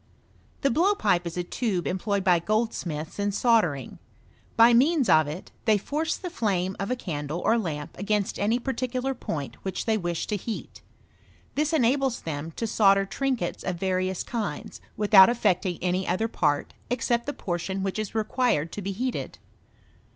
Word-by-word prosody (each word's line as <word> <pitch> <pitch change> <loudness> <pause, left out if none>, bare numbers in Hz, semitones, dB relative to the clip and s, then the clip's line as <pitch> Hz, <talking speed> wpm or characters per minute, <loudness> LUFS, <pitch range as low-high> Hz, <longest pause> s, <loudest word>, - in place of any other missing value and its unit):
The 275 - +2
blowpipe 230 - +2
is 170 - -6
a 180 - 0
tube 185 -1 -2
employed 195 +1 -1
by 180 -2 +4
goldsmiths 175 -6 -2
in 205 0 +1
soldering. 200 - +1 0.6
By 230 +1 +7
means 275 +2 +4
of 155 -1 +5
it, 155 +5 -7
they 215 -2 +4
force 305 +10 -2
the 360 -2 -6
flame 190 - -1
of 200 - -2
a 255 - +1
candle 150 - -4
or 225 - +4
lamp 155 -10 -3
against 205 0 -1
any 215 +4 +2
particular 255 +1 -2
point 145 - -5
which 190 -2 -4
they 220 -1 +1
wish 175 -2 -2
to 210 - -2
heat. 220 +3 -6 0.7
This 300 +2 0
enables 270 -3 +2
them 155 0 -4
to 230 - -3
solder 195 -3 +4
trinkets 250 -2 -2
of 185 - -2
various 185 0 -1
kinds, 210 -11 -5 0.2
without 205 -2 +7
affecting 185 -6 +1
any 185 +1 0
other 185 +6 +1
part 145 -9 0 0.2
except 240 0 0
the - - 0
portion 190 0 -3
which 195 +2 -2
is 215 0 -4
required 220 - +1
to 205 - -5
be 195 +1 -3
heated. 250 +5 -3
205 Hz, 165 wpm, -26 LUFS, 180-235 Hz, 0.7 s, By